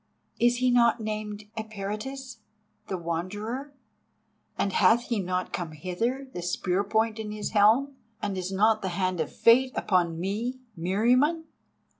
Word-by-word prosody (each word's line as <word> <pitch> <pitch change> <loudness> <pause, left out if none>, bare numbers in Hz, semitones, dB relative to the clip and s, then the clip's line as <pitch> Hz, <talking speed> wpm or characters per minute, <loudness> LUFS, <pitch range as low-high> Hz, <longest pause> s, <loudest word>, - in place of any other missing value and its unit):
"Is 240 0 +4
he 250 +1 +2
not 235 -1 +4
named 215 -1 -4
Eperitus, 220 +5 -5 0.5
the 190 - -2
Wanderer? 205 - -4 0.9
And 195 - 0
hath 240 +1 +4
he 230 -3 +1
not 185 -1 -2
come 170 -3 -3
hither, 225 - -2
the 175 - -4
spear 180 +2 0
point 220 +2 0
in 215 -1 -4
his 210 -1 -4
helm? 230 +7 +4 0.2
And 205 -2 -2
is 185 0 -3
not 215 +3 +3
the 190 - -2
hand 185 -2 0
of 160 - -1
Fate 255 +3 +5
upon 170 -4 +1
me, 215 +8 -2 0.2
Meriamun? 245 - +2
215 Hz, 145 wpm, -27 LUFS, 185-240 Hz, 0.9 s, Fate